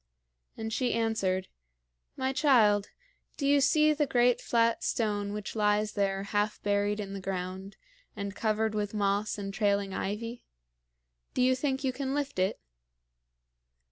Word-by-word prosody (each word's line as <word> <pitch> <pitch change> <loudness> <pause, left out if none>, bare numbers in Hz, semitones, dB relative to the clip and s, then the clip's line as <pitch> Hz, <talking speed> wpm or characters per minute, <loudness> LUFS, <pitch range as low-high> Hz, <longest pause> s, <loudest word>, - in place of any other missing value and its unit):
And 220 0 -4
she 250 0 0
answered: 195 -5 0 0.7
"My 260 0 -1
child, 225 -8 +4 0.5
do 280 - -2
you 285 0 +4
see 305 +2 +4
the 295 -1 0
great 245 -1 +3
flat 230 -1 +1
stone 205 -3 -1
which 210 0 -5
lies 210 0 +2
there, 195 -1 0
half 205 +1 -1
buried 205 +1 +1
in 200 -1 -5
the 195 - -5
ground, 190 +1 -5 0.4
and 200 0 -5
covered 220 0 0
with 210 0 -2
moss 205 +1 0
and 195 -1 -5
trailing 200 -2 +1
ivy? 230 +6 -4 0.9
Do 250 - +3
you 260 +1 +4
think 265 0 -1
you 260 -1 0
can 270 +1 -3
lift 285 -8 -2
it?" 185 +1 +1
210 Hz, 145 wpm, -29 LUFS, 200-250 Hz, 0.9 s, child